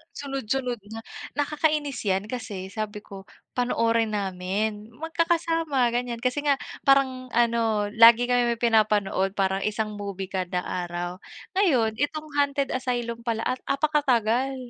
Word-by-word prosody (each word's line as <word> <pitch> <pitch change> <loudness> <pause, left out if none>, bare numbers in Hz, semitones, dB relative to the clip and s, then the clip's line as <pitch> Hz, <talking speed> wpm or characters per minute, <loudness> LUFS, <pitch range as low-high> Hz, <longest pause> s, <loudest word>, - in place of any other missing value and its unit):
Sunod-sunod 270 -3 -2
nga. 225 0 -7 0.3
Nakakainis 295 -2 0
yan 195 +2 0
kasi 200 -6 -5
sabi 210 0 -5
ko 195 -2 -11 0.3
panoorin 230 -3 +1
namin 200 +2 -2
magkakasama, 330 -3 +1
ganiyan, 240 -1 -3
kasi 255 +2 0
nga 285 - +5 0.3
parang 265 -2 +3
ano, 230 -3 +2
lagi 235 +2 +7
kami 245 -1 +3
may 230 - -15
pinapanood 210 -4 +2
parang 195 -1 +1
isang 215 0 -1
movie 195 -2 -5
kada 180 -2 -2
araw, 175 0 -4 0.4
ngayon 240 - +2
itong 305 +2 -2
Hunted 280 -1 +1
Asylum 240 -2 -3
pala 225 -1 0
at 255 - 0
apakatagal, 270 -4 +1
235 Hz, 125 wpm, -25 LUFS, 210-270 Hz, 0.4 s, lagi